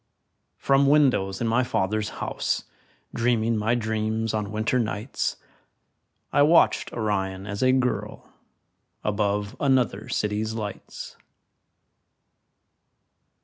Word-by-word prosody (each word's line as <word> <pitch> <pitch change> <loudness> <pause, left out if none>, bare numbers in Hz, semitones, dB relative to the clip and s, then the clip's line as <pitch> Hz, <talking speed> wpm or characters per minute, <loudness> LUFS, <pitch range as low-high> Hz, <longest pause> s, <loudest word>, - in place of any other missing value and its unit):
From 140 0 +3
windows 130 -10 +3
in 115 - +1
my 115 +3 +2
father's 105 -2 -1 0.2
house, - - -1 0.5
Dreaming 115 -1 +1
my 110 +3 +1
dreams 110 -1 -1
on 105 -2 -2
winter 110 +4 0
nights, 110 +2 -2 1.0
I 145 - +4
watched 160 +4 +4
Orion 95 -4 -2
as 100 0 -5
a 130 0 +5
girl 130 -1 -1 0.8
Above 105 +1 -1
another 125 -7 +1
city's 105 +1 -1
lights. 105 -3 -7
110 Hz, 100 wpm, -25 LUFS, 105-125 Hz, 1.0 s, a